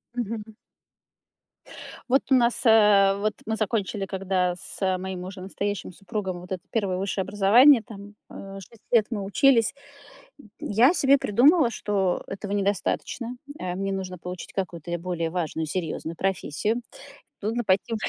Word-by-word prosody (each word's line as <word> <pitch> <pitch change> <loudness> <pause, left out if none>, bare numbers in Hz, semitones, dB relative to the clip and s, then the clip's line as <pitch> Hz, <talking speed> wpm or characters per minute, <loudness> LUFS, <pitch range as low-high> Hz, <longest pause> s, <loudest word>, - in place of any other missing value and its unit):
Мгм. 220 -2 -4 1.6
Вот 270 +2 +4
у - - +7
нас, 240 -1 +3
а 210 -3 +6
вот 210 +1 -1
мы 220 0 -1
закончили 210 -2 -1
когда 185 -2 -1
с 190 -2 -1
моим 185 -1 -5
уже 185 0 -8
настоящим 195 -1 -4
супругом 190 -2 -5
вот 180 - -13
это 185 -2 -3
1 195 -5 -1
высшее 195 0 -2
образование, 215 +7 +6
там, 205 -2 -12
а, 195 0 -9
6 220 +4 -15
лет 225 -3 +5
мы 205 -4 -3
учились. 230 +3 +3 0.9
Я 245 - +3
себе 275 -2 +4
придумала, 265 - +4
что 195 -4 -1
этого 200 +1 -6
недостаточно. 205 +4 -2 0.2
А, 180 -1 -3
мне 195 +1 -2
нужно 185 -1 -4
получить 180 +1 -8
какую-то 175 -3 -3
более 170 -1 -3
важную, 160 -2 -2
серьезную 165 0 -4
профессию. 195 +5 -1 0.6
Нужно 230 +4 -1
пойти 200 +4 +1
195 Hz, 140 wpm, -25 LUFS, 185-220 Hz, 1.6 s, у